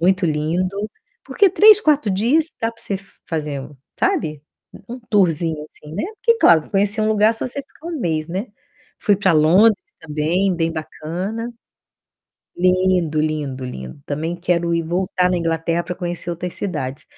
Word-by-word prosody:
muito 185 +2 +2
lindo. 165 +5 -1 0.5
Porque 400 -2 +3
3, 425 +2 +7
4 295 - +2
dias 240 +12 +2
dá 225 0 0
pra 230 - -9
você 200 - -1 0.3
fazer, 150 -4 -3
um 140 +2 -11 0.2
sabe, 155 - 0 0.5
um 245 +2 -6
tourzinho, 165 -6 +3
assim, 150 0 -13
né? - - -2
Porque, 465 0 +2
claro, 165 - +6
conhecer 205 +2 +1
um 215 - +2
lugar 215 +1 +3
só 225 - -1
se 250 - -8
você 280 - -3
ficar 290 +3 -16
1 335 -3 -4
mês, 160 -4 -1
né. 190 +7 -3 0.5
Fui 205 - +3
pra 190 -2 +2
Londres 185 +8 +4 0.2
também, 160 +5 0
bem 165 0 0
bacana. 180 +9 -5 1.0
Lindo, 180 -3 +2
lindo, 150 -4 -2
lindo. 65 - -8
Também 160 +4 -3
quero 175 -1 0
ir 170 - +1
voltar 180 +2 0
na 180 - +1
Inglaterra 165 0 0
pra 180 - -5
conhecer 175 -1 -4
outras 175 +1 -5
cidades. 145 -8 -3
175 Hz, 165 wpm, -20 LUFS, 155-210 Hz, 1.0 s, 3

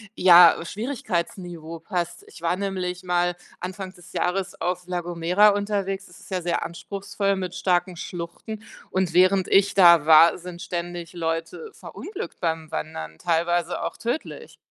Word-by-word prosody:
ja, 175 -2 +8
Schwierigkeitsniveau 180 - -4
passt.“ 175 -1 -4
Ich - - -14
war 170 +1 +1
nämlich 185 -2 -3
mal 175 -1 +1 0.2
Anfang 185 +1 -6
des 175 -3 -16
Jahres 190 +1 -2
auf 180 0 -2
La 180 -1 -2
Gomera 175 +4 +3
unterwegs. 200 -1 -1
Das 180 - -16
ist - - -16
ja 185 -1 -1
sehr 170 0 -1
anspruchsvoll 200 +3 -3
mit 185 -2 -4
starken 180 -1 0
Schluchten. 180 +6 -7 0.3
Und 185 -3 0
während 185 +1 +4
ich 200 0 +4
da 170 -5 +7
war, 160 +1 +7
sind 175 0 -9
ständig 175 -1 -5
Leute 165 - -3
verunglückt 415 - -8
beim 160 -2 -2
Wandern, 80 - -5
teilweise 170 +1 0
auch - - -3
tödlich. 310 - -5
180 Hz, 145 wpm, -24 LUFS, 170-195 Hz, 0.3 s, ja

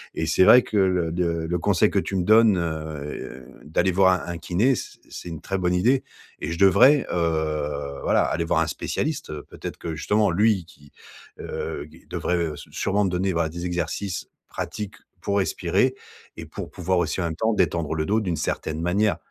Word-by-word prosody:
et - - -1
c'est - - +4
vrai 125 +4 +8
que 105 - -3
le 90 -4 +2
de 90 +2 0 0.2
le 90 0 0
conseil - - +2
que - - +2
tu 95 - -3
me 90 - +1
donnes, 110 0 +5
heu, 75 -5 -5 0.2
d'aller 80 +5 +1
voir 95 0 +5
un - - -3
un - - -5
kiné, 110 +12 +2
c'est - - -7 0.2
c'est 90 - -8
une 80 -3 -7
très 95 - -2
bonne 90 -1 +1
idée 125 +9 +3 0.4
et 75 - -4
je 85 - -3
devrais, 125 +9 +6
heu, 75 -4 -1
voilà, - - +3
aller 85 - -1
voir - - +1
un - - +1
spécialiste, 155 -1 -3
heu, 75 -1 -6
peut-être - - -7
que, 80 -1 -5
justement 105 +6 +2
lui, 105 0 +2
qui, 75 -3 -19 0.5
heu, 70 - -5
gue 80 +2 -18
devrait, 90 0 -1
heu, 85 -3 -1
s - - -10
sûrement 100 +1 0
me - - +1
donner, 95 +1 0
bah, 85 -1 0
des 85 +2 -6
exercices 90 +1 -3 0.2
pratiques 105 -2 -5 0.3
pour 100 0 0
respirer 95 - +1 0.4
et - - -7
pour - - -7
pouvoir 90 +1 0
aussi, 85 0 -1
en - - 0
même 80 -1 -3
temps, 110 +6 +1
détendre 85 -5 0
le 80 0 -1
dos 110 +2 +2
d'une 90 -5 -1
certaine 80 +1 -3
manière. 100 +4 +1
90 Hz, 205 wpm, -24 LUFS, 80-100 Hz, 0.5 s, vrai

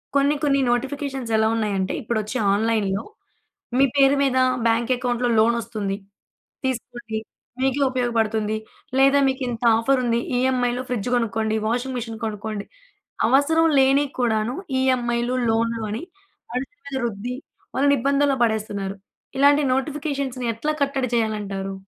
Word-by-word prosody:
కొన్ని, 280 +1 +3
కొన్ని 275 -1 +3
నోటిఫికేషన్స్ 270 -1 -2
ఎలా 220 0 +3
ఉన్నాయంటే, 200 -4 -1
ఇప్పుడొచ్చే 220 0 -2 0.2
ఆన్‌లై‌న్‌‌లో, 205 -2 0 0.8
మీ 275 - +6
పేరు 275 0 +5
మీద 260 -1 +1 0.3
బ్యాంక్ 230 +2 +1
అకౌంట్‌లో 245 0 0
లోనొస్తుంది. 220 -3 +1 0.7
తీసుకోండి. 240 -3 -3 0.4
మీకే 270 +1 +1
ఉపయోగపడుతుంది. 225 -4 0 0.4
లేదా 275 +1 +5
మీకు 265 +1 -1
ఇంత 235 -1 -4
ఆఫర్ 255 +4 +2
ఉంది. 235 -1 +1 0.2
ఈఎంఐలో 250 -1 +1
ఫ్రిడ్జ్ 245 -2 -2
కొనుక్కోండి, 220 -2 0
వాషింగ్ 250 +3 -1
మిషన్ 225 -1 -5
కొనుక్కోండి. 210 -1 -4 0.6
అవసరం 285 +6 +4
లేనివి 270 +1 +4
కూడాను 225 -1 +1 0.3
ఈఎంఐ‌లు, 245 -1 +1
లోన్‌లు 230 0 0
అని 220 - -3 0.5
వాళ్ళ 250 +2 -1
మీద 280 -8 -9
రుద్ది, 235 +3 -4 0.4
వాళ్ళని 280 +1 +4
ఇబ్బందుల్లో 280 +1 +2
పడేస్తున్నారు. 205 -3 -2 0.4
ఇలాంటి 285 +1 +5
నోటిఫికేషన్స్‌ని 275 -3 -2
ఎట్లా 300 +8 -2
కట్టడి 270 -3 -1
చేయాలంటారు? 205 -4 -2
240 Hz, 120 wpm, -23 LUFS, 220-270 Hz, 0.8 s, మీ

